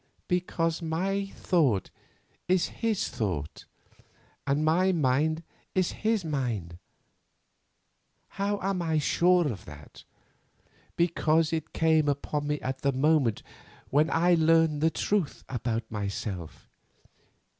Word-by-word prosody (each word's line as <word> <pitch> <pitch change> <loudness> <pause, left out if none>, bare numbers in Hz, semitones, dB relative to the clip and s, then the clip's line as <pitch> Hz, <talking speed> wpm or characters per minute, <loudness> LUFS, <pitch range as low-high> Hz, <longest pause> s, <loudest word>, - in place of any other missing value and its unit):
Because 170 -2 0
my 190 +5 -1
thought, 150 - +1 0.6
is 185 0 +2
his 225 -3 -1
thought, 85 -9 -4 0.8
and 145 +2 +1
my 180 +4 +3
mind 155 +1 +1 0.3
his 200 +2 0
mind. 115 - -3 1.5
How 200 +1 -1
am 195 -1 -1
I 160 -2 0
sure 175 +3 +3
of 105 -9 -5
that? 75 0 -13 0.9
Because 165 -1 +2
it 160 -2 -3
came 160 -2 +3
upon 145 +1 -2
me 150 0 -1
at 130 +1 -4
the 140 - +2
moment 135 -4 +2 0.5
when 150 +3 +3
I 175 +2 +3
learned 160 -2 +3
the 160 - +4
truth 180 0 -1
about 120 -2 -2
myself. 100 -4 -5
155 Hz, 110 wpm, -28 LUFS, 130-175 Hz, 1.5 s, the